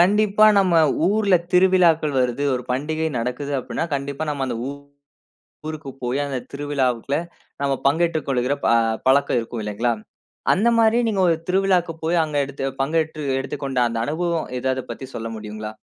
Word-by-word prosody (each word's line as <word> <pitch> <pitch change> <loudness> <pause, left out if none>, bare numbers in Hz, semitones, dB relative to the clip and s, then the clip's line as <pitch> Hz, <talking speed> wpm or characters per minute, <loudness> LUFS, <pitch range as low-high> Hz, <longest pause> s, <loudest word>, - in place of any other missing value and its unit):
கண்டிப்பா 210 +3 +4
நம்ம 185 -3 +3 0.3
ஊர்ல 205 -1 +3 0.2
திருவிழாக்கள் 175 -6 +4
வருது, 125 +3 0
ஒரு 125 - -3
பண்டிகை 155 +5 -1
நடக்குது 125 +4 -3
அப்பிடின்னா, 130 - -3
கண்டிப்பா 140 +2 -3
நாம் 140 -2 -2
அந்த 120 -2 -3
ஊ - - -3 1.0
ஊருக்கு 155 -3 -6
போயி 125 +3 -1
அந்த 140 -2 -3
திருவிழாவுக்குள்ள 140 -3 -1 0.4
நம்ம 140 -1 +1
பங்கேற்றுக் 160 +1 +1
கொள்கிற 130 0 +1
ப - - +3 0.4
பழக்கம் 135 -1 +3
இருக்கும் 115 0 -6
இல்லேங்களா, 105 +3 -1 0.6
அந்தமாரி 230 +2 +3
நீங்க 205 -3 0
ஒரு 165 - +3
திருவிழாக்கு 185 -2 +2
போய் 165 +1 +2
அங்க 150 -2 -4
எடுத்து 135 0 -5 0.2
பங்கேற்று 155 +1 -1 0.2
எடுத்துக் 135 +2 -5
கொண்ட 135 -2 -2
அந்த 115 -1 -2
அனுபவம் 165 +2 -1
ஏதாவது 130 0 -1
பத்தி 135 - -6
சொல்ல 115 0 -4
முடியுங்களா? 105 0 -7
145 Hz, 150 wpm, -22 LUFS, 130-175 Hz, 1.0 s, கண்டிப்பா